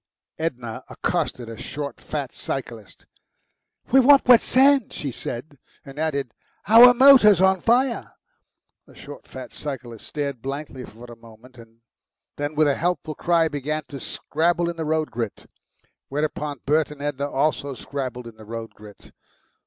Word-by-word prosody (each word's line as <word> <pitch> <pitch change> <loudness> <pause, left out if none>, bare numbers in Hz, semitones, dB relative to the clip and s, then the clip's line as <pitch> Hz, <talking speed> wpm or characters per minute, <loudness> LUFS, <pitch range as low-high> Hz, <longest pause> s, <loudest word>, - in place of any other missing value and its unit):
Edna 125 -8 -4
accosted 120 -2 -2
a 115 - -8
short, 145 +4 -6
fat 140 -4 -5
cyclist. 115 -6 -7 0.9
"We 265 - +6
want 275 +2 +6
wet 245 -2 +8
sand," 275 +1 +3
she 140 - -4
said, 130 +4 -7 0.3
and 135 +1 -10
added, 140 -6 -2 0.3
"our 240 +4 +9
motor's 245 -7 +7
on 190 -1 +3
fire." 245 +1 +1 0.7
The - - -18
short, - - -12
fat - - -10
cyclist 125 -6 -7
stared 140 -5 -4
blankly 135 -1 -6
for 115 +3 -13
a 120 -1 -11
moment, 115 +2 -17 0.8
then 145 +1 -4
with 155 0 +3
a 145 - +3
helpful 170 -2 -2
cry 165 +1 +1
began 150 +1 -3
to 140 - -7
scrabble 170 +5 -1
in - - -11
the 160 -1 -4
road 155 0 -1
grit. 115 -3 -5 0.6
Whereupon 150 -1 -3
Bert 155 +2 +2
and 150 -1 -11
Edna 145 -1 -3
also 140 -1 -1
scrabbled 130 -2 -6
in 115 -1 -12
the 110 - -13
road 115 +1 -7
grit. 105 -1 -15
145 Hz, 150 wpm, -23 LUFS, 125-165 Hz, 0.9 s, our